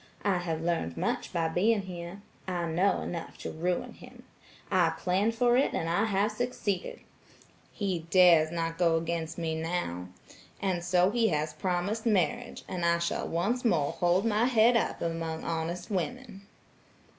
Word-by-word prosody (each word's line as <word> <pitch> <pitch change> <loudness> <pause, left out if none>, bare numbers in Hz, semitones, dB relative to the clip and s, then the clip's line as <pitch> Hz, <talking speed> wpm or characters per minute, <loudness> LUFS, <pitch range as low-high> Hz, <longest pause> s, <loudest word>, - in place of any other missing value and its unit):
I 195 -3 +2
have 165 -2 -3
learned 165 - -1
much - - -2
by 165 -1 0
being 200 +6 +2
here. 180 +1 -8 0.2
I 175 -2 -1
know 175 +4 +1
enough 170 -2 -6
to - - -6
ruin 175 +3 -2
him. - - -14 0.5
I 180 -3 +4
planned 200 +5 +1
for 240 +1 +3
it 270 - +2
and 165 - -1
I 170 +6 +2
have 205 0 +1
succeeded. 215 -5 -3 0.7
He 185 -6 -3
dares 170 -4 +6
not 165 -1 -3
go 165 -2 +4
against 165 0 -3
me 165 -2 -2
now, 160 - -3 0.5
and 185 -3 -1
so 180 +2 +3
he 230 0 +2
has 155 -3 -1
promised 185 +7 -2
marriage, 235 +4 0
and 180 -2 -4
I 170 0 +3
shall 170 0 -2
once 205 +10 -1
more 155 - +2
hold 180 +4 +1
my 220 +1 +2
head 240 -1 +4
up 230 - 0
among 165 -1 -3
honest 170 +5 -3
women." 205 +1 -4
180 Hz, 160 wpm, -29 LUFS, 165-205 Hz, 0.7 s, dares